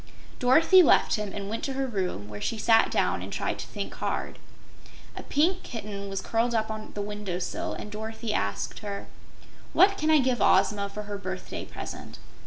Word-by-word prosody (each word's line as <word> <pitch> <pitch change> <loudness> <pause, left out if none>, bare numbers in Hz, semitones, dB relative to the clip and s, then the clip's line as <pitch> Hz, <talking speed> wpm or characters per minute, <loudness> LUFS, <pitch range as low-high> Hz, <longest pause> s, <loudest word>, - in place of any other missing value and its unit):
Dorothy 320 +9 +6
left 330 - +5
him 210 -2 -1
and 200 0 -5
went 225 +2 -4
to 275 - -2
her 270 0 -1
room, 185 - -3
where 105 0 -8
she 225 - -1
sat 225 +1 +5
down - - +1
and - - -7
tried - - -2
to - - -6
think - - -5
hard. - - -3 0.8
A - - -6
Pink 350 +6 +1
Kitten 205 -3 -6
was 195 -1 -3
curled 230 +3 0
up 220 0 0
on 215 0 -6
the 205 - -2
window 205 -3 -4
sill 180 - -3
and 210 - -7
Dorothy 220 +1 -4
asked 100 - -2
her: 200 -2 -5 0.7
"What 395 +1 +5
can 310 - +1
I 315 - +7
give 255 -3 +1
Ozma 200 +1 +3
for 210 +1 -6
her 205 -1 -5
birthday 185 -1 -5
present?" - - -8
210 Hz, 195 wpm, -27 LUFS, 200-245 Hz, 0.8 s, I